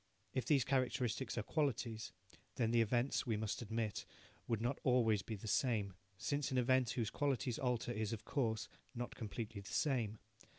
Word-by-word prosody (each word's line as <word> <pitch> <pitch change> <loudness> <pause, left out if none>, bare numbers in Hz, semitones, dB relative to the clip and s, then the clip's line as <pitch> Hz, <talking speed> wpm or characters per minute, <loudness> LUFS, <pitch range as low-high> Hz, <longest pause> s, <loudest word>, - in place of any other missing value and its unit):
If 130 - 0
these 140 -5 +5
characteristics 130 -2 0
are 120 - 0
qualities, 115 -6 -1 0.4
then 115 -2 +2
the 120 0 +5
events, 120 +4 +1
we 110 -3 +1
must 110 +2 -2
admit, 110 -1 -2 0.4
would 115 -3 +1
not 120 +4 0
be - - -21
always 115 -5 +4
the 110 +1 -6
same, 105 -5 +2 0.2
since 140 +8 0
an 130 - 0
event 125 0 +4
whose 115 -4 -1
qualities 135 -4 0
alter 125 -2 0
is, 110 -2 -1
of 110 -2 -4
course, 110 -5 0 0.3
not 120 0 -3
completely 110 -1 -5
the 100 - -9
same. 120 -7 +1
120 Hz, 170 wpm, -38 LUFS, 110-130 Hz, 0.4 s, these